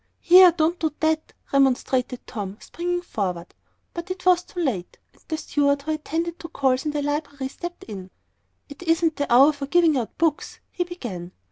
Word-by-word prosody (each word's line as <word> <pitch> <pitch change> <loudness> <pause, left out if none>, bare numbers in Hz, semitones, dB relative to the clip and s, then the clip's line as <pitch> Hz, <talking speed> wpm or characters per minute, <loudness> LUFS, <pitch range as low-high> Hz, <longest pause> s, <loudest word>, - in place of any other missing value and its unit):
"Here, 360 0 +8
don't 330 +1 0
do 315 -2 0
that," 315 0 0 0.2
remonstrated 260 -2 +1
Tom, 205 -2 -6
springing 350 +1 -3
forward. 180 - -4 0.4
But 340 +1 -6
it 370 0 -6
was 360 -1 +5
too 355 - -9
late, 230 - -2 0.2
and - - -27
the 315 - -2
steward 285 -2 +1
who 315 - -2
attended 330 +2 -3
to 330 - -7
calls 265 -2 0
on - - 0
the 295 -1 -2
library 285 -2 -3
stepped 345 +5 -8
in. 190 -4 -8 0.6
"It 285 +2 -12
isn't 330 -1 +1
the 285 - -2
hour 275 +5 +7
for 280 -1 -6
giving 330 -2 +4
out 230 - -6
books," 320 -2 -1
he 355 - -1
began. 205 - -7
300 Hz, 180 wpm, -24 LUFS, 260-340 Hz, 0.6 s, Here